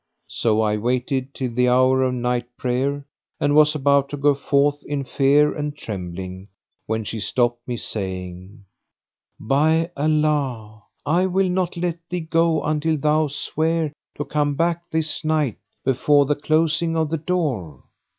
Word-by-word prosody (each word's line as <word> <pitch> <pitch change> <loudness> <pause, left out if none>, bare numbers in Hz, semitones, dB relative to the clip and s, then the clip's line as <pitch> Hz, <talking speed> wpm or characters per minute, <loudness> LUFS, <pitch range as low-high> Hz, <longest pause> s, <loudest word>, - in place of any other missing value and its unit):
So 110 -1 +1
I 105 -1 +1
waited 125 +3 -1
till 130 -2 -3
the 125 +1 +2
hour 130 +1 +4
of 130 -1 +1
night 125 0 -1
prayer 135 +3 -1 0.3
and 145 - +1
was 150 0 +5
about 140 -1 +2
to 145 - -5
go 145 +1 +3
forth 140 +1 +1
in 145 -1 -2
fear 140 +3 +3
and 150 -1 -4
trembling, 95 -3 -6 0.4
when 110 0 -1
she 110 +2 -5
stopped 120 +2 0
me, 120 -1 -3
saying, 95 0 -5 0.7
"By 160 +7 +2
Allah, 140 -8 0 0.2
I 175 +5 +2
will 190 0 +1
not 180 -1 -1
let 170 -1 -2
thee 180 -1 -2
go 165 0 +1
until 155 +1 0
thou 150 +2 +2
swear 155 +2 -1 0.2
to 145 - -3
come 145 -1 0
back 170 +2 -1
this 160 +1 -1
night 155 -7 0 0.3
before 140 +2 +3
the 145 +2 +1
closing 160 +2 +1
of 160 -1 0
the 165 - -1
door." 140 - -2
145 Hz, 150 wpm, -22 LUFS, 125-155 Hz, 0.7 s, was